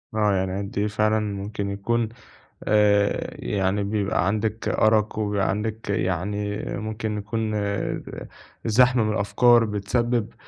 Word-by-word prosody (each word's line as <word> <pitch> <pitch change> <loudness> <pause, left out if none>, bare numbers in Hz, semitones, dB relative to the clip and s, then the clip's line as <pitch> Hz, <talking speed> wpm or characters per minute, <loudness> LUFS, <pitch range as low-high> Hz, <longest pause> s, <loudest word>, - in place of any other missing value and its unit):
آه 105 -2 +3
يعني 95 +1 -1
أنتِ 100 0 -4
فعلًا 105 +1 +1
ممكن 100 0 -4
يكون 110 +3 -1 0.5
آآ 105 -1 +2
يعني 100 0 0
بيبقى 100 -2 0
عندِك 110 +1 -1
أرق 110 -1 +2
وبيبقى 105 -2 0
عندِك 105 +1 -3
يعني 100 +2 -1
ممكن 110 0 -3
يكون 110 +2 -2 1.1
زحمة 125 +1 +4
من 105 - 0
الأفكار 115 +3 +4
بتسبب 115 +2 -1
105 Hz, 115 wpm, -24 LUFS, 100-110 Hz, 1.1 s, زحمة